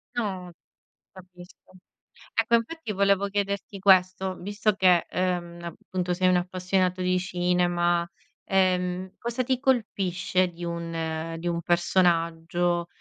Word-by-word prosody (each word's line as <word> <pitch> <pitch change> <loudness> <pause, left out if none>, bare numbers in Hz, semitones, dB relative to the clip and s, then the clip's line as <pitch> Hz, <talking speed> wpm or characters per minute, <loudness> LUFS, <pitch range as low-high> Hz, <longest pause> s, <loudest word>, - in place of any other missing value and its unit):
No, 190 -6 -3 0.6
capisco. 180 -1 -15 0.6
Ecco, 225 +1 +3
infatti, 235 +3 -2
volevo 200 0 +2
chiederti 200 0 -3
questo, 190 -1 +3
visto 205 +3 -1
che, 185 -3 +4
ehm, 175 -2 -2
appunto, 180 +1 -4
sei 185 +1 +1
un 180 - +4
appassionato 185 +1 0
di 185 0 +2
cinema, 175 -1 +1 0.4
ehm, 185 -1 0
cosa 235 +2 -2
ti 255 0 0
colpisce 190 -8 +1
di 175 0 -10
un 165 -1 -4
di 175 - -4
un 170 -1 -1
personaggio? 175 0 +1
180 Hz, 115 wpm, -26 LUFS, 175-195 Hz, 0.6 s, che